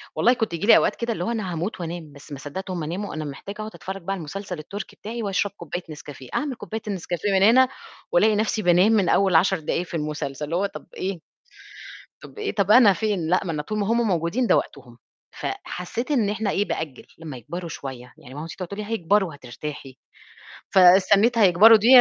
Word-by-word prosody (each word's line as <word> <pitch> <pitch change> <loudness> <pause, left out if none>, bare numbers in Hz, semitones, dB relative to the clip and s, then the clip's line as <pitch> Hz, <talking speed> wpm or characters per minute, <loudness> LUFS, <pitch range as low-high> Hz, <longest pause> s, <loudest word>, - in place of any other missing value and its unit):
والله 245 - +4
كنت 225 -7 -2
ييجي 170 +5 -3
لي - - +9
أوقات - - +2
كده 235 0 -2
اللي 175 - -4
هو 230 - -1
أنا 215 -6 -3
هاموت 175 +4 -4
وأنام، 165 -3 -6
بس 145 +1 -15
ما 140 - -6
صدّقت 185 +8 -6
هُم 175 -3 -3
ناموا 180 +7 -4
أنا 155 -1 -4
محتاجة 145 +8 -7
أقعُد 215 0 -5
أتفرّج 195 +1 -7
بقى 180 +3 -4
على 195 - -5
المسلسل 180 +2 -6
التركي 200 +6 -8
بتاعي 230 +2 -6
وأشرب 200 0 0
كوباية 175 +2 -6
نسكافيه، 145 -4 -10
أعمل 285 -3 -1
كوباية 220 0 -6
النسكافيه 190 0 -2
من 190 0 +3
هنا 255 +5 +6 0.4
وألاقي 210 +5 +4
نَفْسي 215 +1 0
بانام 180 +3 +4
من 200 -6 +3
أول 195 -3 +3
10 185 +3 +4
دقايق 165 +3 -2
في - - -12
المسلسل، 150 -2 -4
اللي 160 +3 -3
هو 190 +3 +1
طَب 200 - -8
إيه؟! 190 -1 -4 1.0
طَب - - -13
إيه، 420 -1 -3
طَب 200 -1 +2
أنا 220 -3 +8
فين، 195 -3 -1
لأ، 180 +3 +2
ما 170 - -2
أنا 150 -2 -2
طول 215 +8 -4
ما 200 - -1
هُم 230 +2 +2
موجودين 180 +7 0
ده - - +5
وقتهم، - - -6 0.3
فحسّيت 240 - -5
إن 230 -8 +2
إحنا 210 0 -1
إيه 200 +1 +1
بأجّل 150 -9 -5
لمّا 155 -5 -8
يكبروا 170 +9 -7
شوية 130 -4 -8
يعني 125 - -13
ماما 150 +3 -6
تيج 165 - -9
تقعد 185 -2 -5
تقول 200 +3 -7
لي 210 - -4
"هيكبروا 195 -1 +2
وهترتاحي" 140 -1 -8 0.7
فاستنّيت 195 +5 +5
هيكبروا 215 +2 +7
دي 215 +2 0
185 Hz, 215 wpm, -24 LUFS, 160-210 Hz, 1.0 s, لي